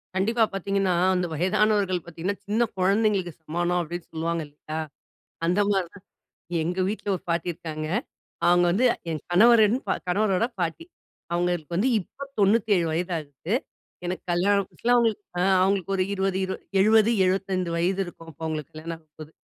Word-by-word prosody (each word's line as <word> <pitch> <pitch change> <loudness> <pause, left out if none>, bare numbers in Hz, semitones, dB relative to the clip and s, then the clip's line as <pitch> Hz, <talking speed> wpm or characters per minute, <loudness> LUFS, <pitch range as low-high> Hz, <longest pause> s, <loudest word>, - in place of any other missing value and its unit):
கண்டிப்பா 225 +5 +2
பார்த்தீங்கன்னா 195 -1 0 0.2
அந்த 180 -1 0
வயதானவர்கள் 195 +2 +2
பார்த்தீங்கன்னா, 175 +4 -4
சின்ன 220 +3 +2
குழந்தைகளுக்கு 195 -1 +2
சமானம் 175 +3 0
அப்படின்னு 175 +1 -6
சொல்லுவாங்க 165 +1 -2
இல்லையா. 150 +2 -8 0.7
அந்த 180 +4 +2
மாரி 190 -3 +1
தான் 200 -1 -15 0.6
எங்க 175 +3 -2
வீட்ல 210 +1 -4
ஒரு - - -7
பாட்டி 170 +1 0
இருக்காங்க. 155 -1 -5 0.6
அவங்க 175 0 +5
வந்து 220 +9 +2 0.2
என் 155 -2 -3
கணவரின் 220 +3 +6 0.3
கணவரோட 195 +2 +2
பாட்டி. 170 - -2 0.5
அவங்களுக்கு 175 -2 -1
வந்து 215 +9 +2
இப்ப 275 +9 -9
97 200 -3 +3
வயதாகுது. 160 -1 -3 0.5
எனக்கு 180 +1 -3
கல்யாணம் 200 +3 +2
புதுசுல 240 - -2
அவங்களுக்கு 225 -3 +2 0.2
அ - - +2 0.2
அவங்களுக்கு 195 0 +1
ஒரு 185 - +2
20, 190 -1 0
20, 190 - -4 0.2
70, 220 +2 +5
75 185 -1 0
வயது 185 +3 +1
இருக்கும் 165 -2 -11
அப்ப 160 +2 -8
எங்களுக்கு 155 -3 -4
கல்யாணம் 160 +2 -6
ஆகப்போது. 155 -1 -13
185 Hz, 145 wpm, -25 LUFS, 170-200 Hz, 0.7 s, கணவரின்